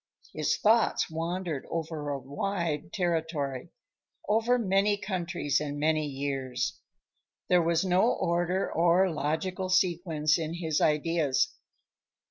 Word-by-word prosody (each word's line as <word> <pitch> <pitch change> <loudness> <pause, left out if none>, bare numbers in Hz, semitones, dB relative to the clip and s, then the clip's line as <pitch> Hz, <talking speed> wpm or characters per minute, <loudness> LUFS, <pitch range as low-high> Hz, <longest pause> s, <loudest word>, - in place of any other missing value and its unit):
His - - 0
thoughts 220 -5 +2
wandered 165 -2 -3
over 160 -3 -4
a 140 - -1
wide 150 +4 -3
territory; 160 -7 -2 0.6
over 225 +4 +3
many 205 -1 +2
countries 175 -7 -1
and 145 -1 -4
many 155 0 +1
years. 135 -2 -3 0.7
There 180 -1 +5
was 170 +2 +1
no 185 +6 +3
order 175 +2 0
or 175 +3 +3
logical 170 +5 -2
sequence 170 -4 +2
in 160 +1 -3
his 160 -3 -1
ideas. 160 +3 +1
170 Hz, 110 wpm, -28 LUFS, 150-185 Hz, 0.7 s, There